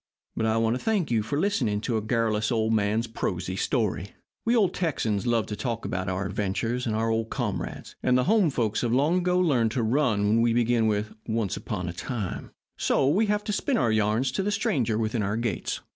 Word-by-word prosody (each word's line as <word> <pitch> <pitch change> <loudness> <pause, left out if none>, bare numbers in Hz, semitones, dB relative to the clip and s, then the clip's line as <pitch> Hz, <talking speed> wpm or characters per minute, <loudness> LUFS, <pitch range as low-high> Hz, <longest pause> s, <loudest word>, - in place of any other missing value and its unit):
But 110 - 0
I 110 0 +2
want 115 +1 +2
to 130 - -5
thank 205 - 0
you 115 -2 +3
for 140 +8 -2
listening 130 - +1
to 115 - -1
a 110 - +1
garrulous 110 -1 0
old 110 -1 +1
man's 110 +2 +1
prosy 95 -5 -3
story. 100 -3 -1 0.3
We 235 +2 +3
old 205 -6 +3
Texans 120 - -1
love 115 -2 +2
to 105 - -5
talk 115 -1 -3
about 90 0 -2
our 95 +1 -2
adventures 115 +6 -2
and 110 - 0
our 115 +1 +1
old 115 0 -1
comrades, - - -4
and 125 0 +3
the 125 - +2
home 205 - +3
folks 115 -6 0
have 120 - 0
long 150 +8 +3
ago 180 0 +1
learned 135 -11 +3
to 120 - 0
run 110 -4 +2
when 110 +2 +3
we 115 0 +3
begin 120 -1 +2
with 105 0 -1
'Once 110 -4 -1
upon 90 -5 -4
a 85 - -3
time,' 105 +1 -4 0.3
so 135 - +2
we 200 +10 +3
have 210 0 0
to 210 - -2
spin 260 +5 0
our 115 - +2
yarns 110 +4 +1
to - - -1
the 195 - -1
stranger 120 - 0
within 110 0 -1
our 100 +2 -1
gates." 115 -2 -2
115 Hz, 220 wpm, -26 LUFS, 110-130 Hz, 0.3 s, you